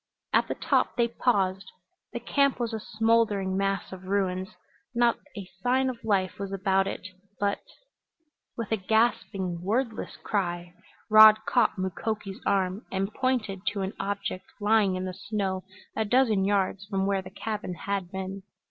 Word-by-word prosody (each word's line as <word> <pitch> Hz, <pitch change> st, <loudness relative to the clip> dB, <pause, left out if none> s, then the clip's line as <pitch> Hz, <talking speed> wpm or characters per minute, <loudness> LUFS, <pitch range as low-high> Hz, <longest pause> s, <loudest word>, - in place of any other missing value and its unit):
At -, -, +4 dB
the -, -, -2 dB
top -, -, +1 dB
they 235 Hz, -1 st, +3 dB
paused. 195 Hz, -5 st, 0 dB, 0.4 s
The 240 Hz, -, -4 dB
camp 280 Hz, +3 st, +2 dB
was 235 Hz, -1 st, -2 dB
a 220 Hz, -, -2 dB
smoldering 215 Hz, -4 st, +1 dB
mass 195 Hz, 0 st, -1 dB
of 190 Hz, 0 st, -9 dB
ruins. 190 Hz, -1 st, 0 dB, 0.5 s
Not 235 Hz, -1 st, +3 dB, 0.2 s
a 195 Hz, -2 st, -6 dB
sign 260 Hz, +2 st, +2 dB
of 235 Hz, -2 st, -13 dB
life 195 Hz, -4 st, 0 dB
was 200 Hz, -1 st, -4 dB
about 195 Hz, 0 st, +1 dB
it. 185 Hz, -, -5 dB, 0.3 s
But 200 Hz, 0 st, +1 dB, 1.0 s
With 230 Hz, -3 st, -4 dB
a 220 Hz, -, +3 dB
gasping, 195 Hz, -4 st, 0 dB
wordless 225 Hz, +4 st, -2 dB
cry 175 Hz, -3 st, -2 dB, 0.3 s
Rod 215 Hz, 0 st, +8 dB
caught 245 Hz, -, +2 dB
Mukoki's 195 Hz, +2 st, -3 dB
arm 195 Hz, +1 st, +1 dB
and 195 Hz, +2 st, -1 dB
pointed 245 Hz, -7 st, -1 dB
to 205 Hz, -1 st, 0 dB
an 190 Hz, +1 st, -2 dB
object 200 Hz, -2 st, -3 dB
lying 205 Hz, -2 st, +3 dB
in 185 Hz, 0 st, -3 dB
the 185 Hz, -, -4 dB
snow 190 Hz, -1 st, -3 dB, 0.3 s
a 220 Hz, -, +1 dB
dozen 220 Hz, -3 st, +3 dB
yards 195 Hz, -1 st, +1 dB
from 195 Hz, -2 st, 0 dB
where 195 Hz, -1 st, +1 dB
the 185 Hz, -, -10 dB
cabin 210 Hz, -2 st, -4 dB
had 195 Hz, 0 st, -3 dB
been. 190 Hz, +1 st, -5 dB
200 Hz, 155 wpm, -27 LUFS, 190-220 Hz, 1.0 s, Rod